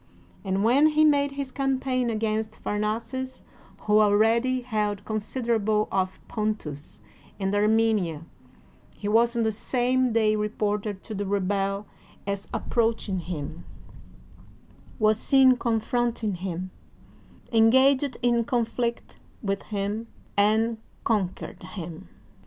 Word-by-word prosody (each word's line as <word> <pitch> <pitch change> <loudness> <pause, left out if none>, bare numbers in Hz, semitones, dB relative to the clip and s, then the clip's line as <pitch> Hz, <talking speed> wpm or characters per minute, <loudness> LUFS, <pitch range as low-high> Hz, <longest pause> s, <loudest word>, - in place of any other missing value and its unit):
And 195 0 0
when 265 +7 +5
he 310 0 +4
made 285 -2 +3
his 275 -1 -4
campaign 260 -2 0
against 220 0 -1
Phamaces, 230 +5 -3 0.4
who 210 0 +3
al 205 -1 +4
ready 235 +4 +3
held 210 -4 -2
considerable 220 -1 0
of 190 -1 -1
Pontus 210 -10 -4 0.4
and 195 0 -1
Armenia, 210 -6 +2 0.7
he 205 - -6
was 230 +3 +3
on 235 - +1
the 220 - +2
same 250 +3 +1
day 220 -1 +3
reported 210 -1 -2
to 220 - -7
the 200 -1 -3
rebel 195 +1 0 0.4
as 200 0 -3
approaching 225 -5 0
him, 155 - -6 1.3
was 215 0 +3
seen 265 -2 +5
confronting 235 -2 0
him, 185 0 -5 0.8
en 225 0 +6
gaged 265 +1 +4
in 240 -1 +3
conflict 235 -1 -2 0.3
with 195 -1 -1
him, 210 +2 -2 0.3
and 220 +2 +2 0.2
conquered 200 -5 -2
him. 175 - -8
220 Hz, 115 wpm, -26 LUFS, 200-240 Hz, 1.3 s, en